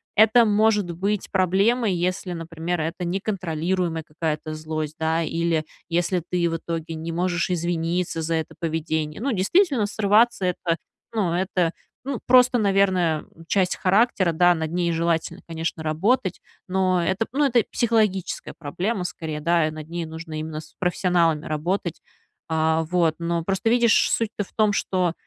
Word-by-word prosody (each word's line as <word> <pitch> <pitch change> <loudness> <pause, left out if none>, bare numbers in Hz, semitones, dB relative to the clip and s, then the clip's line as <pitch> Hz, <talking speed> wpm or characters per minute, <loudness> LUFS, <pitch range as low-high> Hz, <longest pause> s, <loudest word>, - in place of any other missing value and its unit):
это 220 +2 +6
может 210 -3 +2
быть 195 +4 -2
проблемой, 195 +4 +2
если, 180 +1 -2
например, 165 +1 -4
это 165 +3 -3
неконтролируемая 175 -3 -2
какая-то 155 0 -3
злость, 155 0 -4
да, 160 +1 +1
или 165 -1 0 0.3
если 175 +1 +1
ты 175 -1 +1
в 165 - -2
итоге 165 0 -5
не 165 +1 -5
можешь 175 +1 0
извиниться 170 0 -1
за 165 +1 -1
это 160 - -3
поведение. 160 -1 -2
Ну, 275 +1 0
действительно, 255 - +2
срываться- 215 0 +3
это, 170 -2 0 0.4
ну 195 -7 0
это, 180 -2 0 0.3
ну 275 -4 -3
просто, 250 -1 +6
наверное, 190 -6 +2 0.2
часть 185 -2 +1
характера. 195 -2 +3
Да, 175 +2 +5
над 160 -1 -3
ней 175 -1 +1
желательно, 165 +1 -1
конечно, 165 0 -3
работать, 185 +7 +1 0.3
но 185 -1 +1
это, 190 +6 0
ну 290 +1 +2
это 240 -4 +3
психологическая 215 -6 0
проблема, 180 +6 -2
скорее, 160 -3 -5
да, 170 0 +2
и 155 - -3
над 155 0 -8
ней 170 0 -3
нужно 160 0 -7
именно 155 0 -5
с 155 - -18
профессионалами 175 -3 +1
работать, 170 +3 -2 0.5
э, 160 0 +2
вот. 170 -3 +2
Но 170 0 -1
просто, 195 +3 0
видишь, 235 -1 +4
суть-то 220 -2 -1
в - - -16
том, 215 -2 +3
что, 180 -3 0
175 Hz, 150 wpm, -24 LUFS, 165-195 Hz, 0.5 s, это